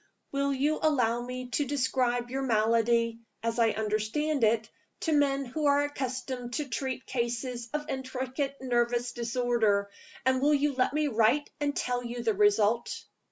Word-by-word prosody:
Will 280 0 0
you 285 +3 +1
allow 245 -6 +2
me 250 +1 -6
to 250 +5 +1
describe 250 -3 0
your 270 +1 -1
malady 230 -1 +2 0.2
(as 230 +1 -1
I 230 -1 +5
understand 220 +7 -1
it) 220 0 +3 0.3
to 325 - 0
men 280 -2 +2
who 295 +4 -1
are 285 0 +4
accustomed 255 -3 -4
to 300 -2 -2
treat 260 -1 -3
cases 240 0 -3
of 300 0 -3
intricate 265 +1 -3
nervous 240 -1 0
disorder? 230 -4 +1 0.3
And 260 0 +3
will 295 +2 +4
you 290 0 +1
let 255 +2 +1
me 305 0 +2
write 235 +4 +2
and 290 -1 -1
tell 245 0 -1
you 240 0 -5
the 225 -2 +2
result?" 210 +3 +2
250 Hz, 160 wpm, -29 LUFS, 230-275 Hz, 0.3 s, I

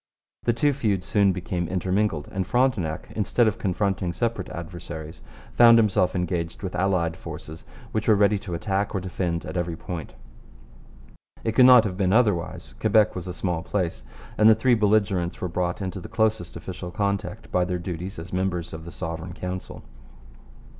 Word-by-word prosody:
The 120 - +4
two 145 +5 +2
feuds 105 -9 -1
soon 100 -1 +3
became 90 -1 -3
intermingled, 95 -3 0
and 95 -1 -2
Frontenac, 105 -11 0
instead 110 +3 +2
of 110 - -1
confronting 95 -2 -1
separate 110 0 -2
adversaries, 85 -3 -8 0.3
found 115 -1 +8
himself 95 -5 +2
engaged 85 -1 -2
with 95 - -4
allied 90 -3 +1
forces 80 +2 -9 0.3
which 110 0 -2
were 110 - +6
ready 100 0 +3
to 90 -3 -5
attack 100 +3 -1
or - - +1
defend 90 -2 -3
at 80 - -6
every 85 -1 -1
point. 85 -4 -6 1.3
It 115 - 0
could 125 +3 +6
not 125 -3 +9
have 95 -4 -3
been 95 -1 +2
otherwise. 105 -7 +1
Quebec 110 0 +4
was 90 -1 -6
a - - -3
small 90 -4 -1
place, 90 -6 -2 0.4
and 110 +1 +7
the 110 - +7
three 120 +3 +3
belligerents 105 -5 +2
were 90 - -2
brought 90 +2 -2
into 95 +1 -4
the - - -9
closest 110 -5 0
official 90 -1 -6
contact 100 +1 -3
by 90 - +2
their 90 0 -1
duties 90 +1 -5
as 85 +2 -8
members 90 -3 -1
of 80 0 -7
the 85 - -8
Sovereign 80 0 -5
Council. 90 +1 -6
95 Hz, 175 wpm, -25 LUFS, 85-105 Hz, 1.3 s, not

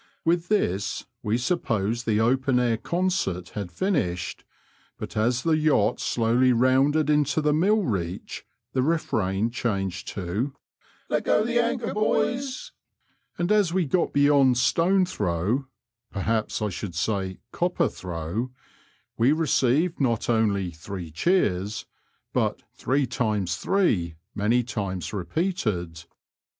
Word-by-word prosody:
" - - -44
With 170 +1 +2
this 100 - 0 0.2
we 105 +2 0
supposed 120 - -1
the 110 -1 +2
open 130 +2 +2
air 120 -2 +2
concert 170 - -1
had 100 -4 -6
finished, 90 - -1 0.5
but - - -7
as 120 +3 +1
the 165 -1 +3
yacht 155 -9 +2
slowly 120 +2 +2
rounded 135 +5 +3
into 150 0 +2
the 150 -1 +2
mill 200 +7 +3
reach 90 - -3 0.3
the 130 - +2
refrain 110 - 0
changed 95 -7 -2
to 105 +9 -2 0.2
— - - -80
" - - -34
Let - - 0
go - - +3
the 240 0 +1
anchor, 235 0 -2
boys," 255 +5 -1 0.7
and 175 +3 0
as 205 -5 +3
we 185 -2 +2
got 170 +5 +1
beyond 140 -3 +4
stone 180 +8 +3
throw 105 - -1 0.2
— 115 0 -57
perhaps 110 +2 -1
I 105 - 0
should 90 -1 -6
say 95 0 -1
copper 180 +1 +1
throw 90 +7 -4 0.4
— - - -38
we 120 +4 +5
received 155 +1 +2
not 120 -3 +1
only 100 -5 +1
three 85 0 -7
cheers, 100 - 0 0.5
but - - 0
three 135 +1 0
times 110 -8 -1
three 100 - +1
" 110 - -55
many 120 +4 +3
times 100 -5 -4
repeated. 95 - -2
120 Hz, 140 wpm, -25 LUFS, 100-155 Hz, 0.7 s, we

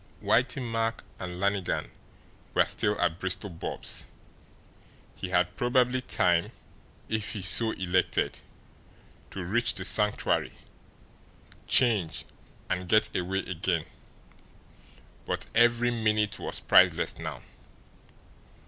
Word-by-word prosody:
Whitey 125 +3 +1
Mack 115 -1 -2 0.2
and 90 -1 -6
Lannigan 100 -1 -1 0.6
were - - +5
still 105 0 0
at 80 +1 0
Bristol 95 +2 -2
Bob's; 85 - -3 1.1
he 95 - -6
had 90 -1 +1
probably 125 +2 +2
time, 85 -7 +1 0.6
if 110 -2 -2
he 100 -4 -5
so 110 +5 +3
elected, 95 -3 0 0.9
to 95 - -6
reach 120 +6 0
the 95 - -4
Sanctuary, 105 +1 +2 1.1
change, 100 -11 +2 0.4
and 90 -1 -3
get 110 +1 +3
away 95 +2 -1
again. 90 -2 -2 1.4
But - - -2
every 120 +1 +4
minute 110 -3 0
was - - -2
priceless - - +4
now. - - -6
100 Hz, 105 wpm, -28 LUFS, 90-115 Hz, 1.4 s, were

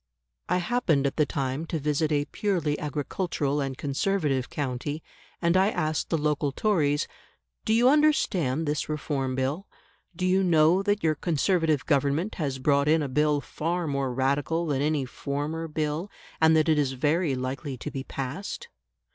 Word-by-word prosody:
I - - +3
happened 180 - +1
at 140 - -1
the 150 -2 +3
time 135 +3 -2
to 165 - -2
visit 150 +1 0
a 145 -1 +1
purely 170 -8 -1
agricultural 145 0 -2
and 135 -2 -3
Conservative 145 -2 0
county, 145 +2 -3 0.4
and 170 +1 +3
I 190 +2 +4
asked 155 -6 -1
the 165 - +1
local 150 -1 0
Tories, 150 -5 +1 0.6
"Do 220 - 0
you 240 +2 +5
understand 200 - +3
this 150 +1 -2
Reform 140 -3 -2
Bill? 140 +9 -2 0.5
Do 180 - -2
you 185 +1 +3
know 170 +1 +4
that 205 +1 0
your 160 -1 +3
Conservative 160 -1 +1
Government 145 +8 +1
has 135 -3 -1
brought 140 +2 +2
in 155 0 +4
a - - -2
Bill 150 +2 +2
far 170 +4 -2
more 140 -3 -1
Radical 140 +6 0
than 140 -4 0
any 150 -2 +1
former 145 +5 -4
Bill, 155 +4 -2 0.3
and 160 0 +6
that 155 0 +3
it 155 -2 +3
is 135 -2 +1
very 150 +3 +1
likely 130 +2 -4
to 150 - -6
be 135 -1 -4
passed?" 140 +9 -5
150 Hz, 165 wpm, -27 LUFS, 140-165 Hz, 0.6 s, and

